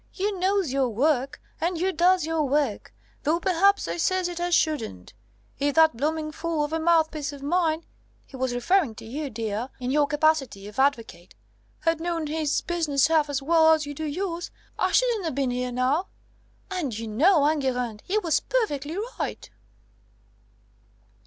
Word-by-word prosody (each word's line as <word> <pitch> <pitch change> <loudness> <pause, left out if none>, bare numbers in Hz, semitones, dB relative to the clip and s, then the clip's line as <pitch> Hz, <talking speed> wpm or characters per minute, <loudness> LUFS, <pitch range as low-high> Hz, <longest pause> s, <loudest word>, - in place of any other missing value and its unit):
You 395 0 -2
knows 375 -6 +1
your 270 -2 +1
work, 275 +3 0 0.2
and 345 +1 0
you 370 +3 0
does 355 +1 +3
your 325 0 0
work 280 -6 0 0.3
though 320 +3 +1
p'raps 390 +2 +2
I - - -3
ses 370 +1 +1
it 350 -1 -5
as 350 0 +1
shouldn't. 110 - -1 0.5
If 285 0 0
that 320 -4 +5
blooming 310 +4 -2
fool 320 -1 -2
of 295 +2 -4
a 325 - 0
mouthpiece 320 -3 +1
of 280 -1 -10
mine' 325 +1 0 0.4
he - - -13
was 260 -1 -1
referring 250 - +1
to - - -11
you, 280 +5 -4
dear, 225 +1 -3
in 250 0 -2
your 290 0 +3
capacity 295 -9 +1
of 210 +5 -8
advocate 230 -10 -1 0.5
'had 330 0 +1
known 335 -2 -2
his 305 -1 -1
business 305 -6 +1
half 310 -2 +3
as 280 -1 -2
well 320 +1 +5
as 310 -1 0
you 290 - -6
do 315 +2 -5
yours, 345 +3 -3 0.3
I - - +1
shouldn't 470 -8 +2
a - - -1
bin 265 -1 -1
here 250 0 -2
now!' 260 +8 0 0.6
And 295 - -2
you 225 0 -5
know, 290 - +4
Enguerrand, 250 -7 -1
he 405 - -1
was 345 -7 +2
perfectly 325 - -2 0.2
right." - - -4
310 Hz, 170 wpm, -25 LUFS, 270-340 Hz, 0.6 s, that